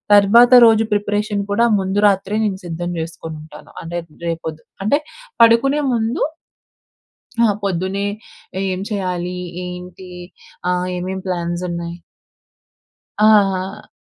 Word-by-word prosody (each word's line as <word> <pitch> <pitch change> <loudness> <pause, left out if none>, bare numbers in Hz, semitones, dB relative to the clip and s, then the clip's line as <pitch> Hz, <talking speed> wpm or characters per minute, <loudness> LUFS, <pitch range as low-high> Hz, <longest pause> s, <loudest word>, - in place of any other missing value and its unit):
తర్వాత 230 +5 +6 0.2
రోజు 225 0 +4
ప్రిపరేషన్ 205 0 -1
కూడా 235 +3 +3
ముందు 190 +2 -1
రాత్రే 195 +2 -1
నేను 195 -2 -2
సిద్ధం 175 +1 -4
జేసుకొనుంటాను. 160 -1 -8
అనేత్ 170 -1 -6 0.2
రేపొద్ 160 -1 -4 0.2
అంటే 285 +9 +2 0.4
పడుకునే 275 +6 +5
ముందు 225 +1 -1 1.2
ఆహ్, 215 - +4
పొద్దునే 190 +1 -1 0.7
ఏం 185 - -3
చెయాలి, 180 -3 -3 0.3
ఏంటి, 180 +1 -9 0.6
ఆహ్, 180 0 0
ఏమేం 185 +1 -4
ప్లాన్సున్నాయి. 175 -1 -3 1.3
ఆ! - - +7 0.2
ఆ! 195 +2 -5
190 Hz, 100 wpm, -19 LUFS, 175-205 Hz, 1.3 s, ఆ